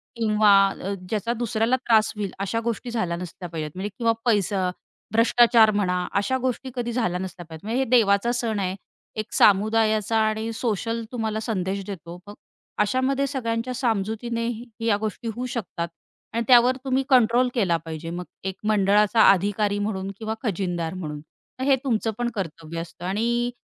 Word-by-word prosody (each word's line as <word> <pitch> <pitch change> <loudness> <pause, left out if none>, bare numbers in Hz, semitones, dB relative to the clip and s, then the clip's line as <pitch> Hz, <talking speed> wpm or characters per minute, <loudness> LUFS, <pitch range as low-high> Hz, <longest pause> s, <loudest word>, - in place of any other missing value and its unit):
किंवा 215 -2 +4 0.2
अ, 195 0 -5 0.2
ज्याचा 220 +2 -1
दुसऱ्याला 230 +1 0
त्रास 220 -4 +3
होईल 205 -3 -3
अशा 200 +4 -1
गोष्टी 235 +2 -4
झाल्या 185 -8 -1
नसल्या 175 0 -7
पाहिजेत 155 -2 -5
म्हणजे 190 +3 -3
किंवा 230 -2 +2
पैसा 200 -4 +2 0.4
भ्रष्टाचार 230 0 +5
म्हणा, 200 -3 0 0.2
अशा 260 +6 +1
गोष्टी 260 +1 -2
कधी 240 -1 -2
झाल्या 225 -7 -1
नसल्या 185 -1 -7
पाहिजे. 160 +2 -11
म्हणजे 235 +3 0
हे - - -3
देवाचा 225 -2 +4
सण 230 -4 -1
आहे. 185 -1 -1 0.4
एक 215 -1 -5
सामुदायाचा 215 +1 +3
आणि 220 +1 -2
सोशल 230 0 -2
तुम्हाला 220 -3 -2
संदेश 195 -3 -2
देतो. 175 -3 -7
मग 205 - -8 0.5
अशामध्ये 260 +6 +1
सगळ्यांच्या 250 -2 -2
सामजुतीने 230 0 -1 0.4
या 205 -3 +3
गोष्टी 220 +3 -4
होऊ 250 - -3
शकतात. 175 -6 -3 0.5
आणि 230 - 0
त्यावर 250 +1 +6
तुम्ही 265 0 +1
कंट्रोल 250 0 +4
केला 190 -9 +2
पाहिजे 160 +1 -6
मग 180 +1 -5 0.3
एक - - -18 0.2
मंडळाचा 210 +2 +4
अधिकारी 205 +2 0
म्हणून 195 -2 -2
किंवा 220 0 -3
खजिनदार 175 -6 -2
म्हणून. 155 -5 -5 0.4
मग - - 0
हे 275 - +6
तुमचं 225 -3 0
पण 240 0 -1
कर्तव्य 165 -3 -5
असतं 170 +1 -9
आणि 235 +5 0
215 Hz, 160 wpm, -24 LUFS, 190-235 Hz, 0.5 s, त्यावर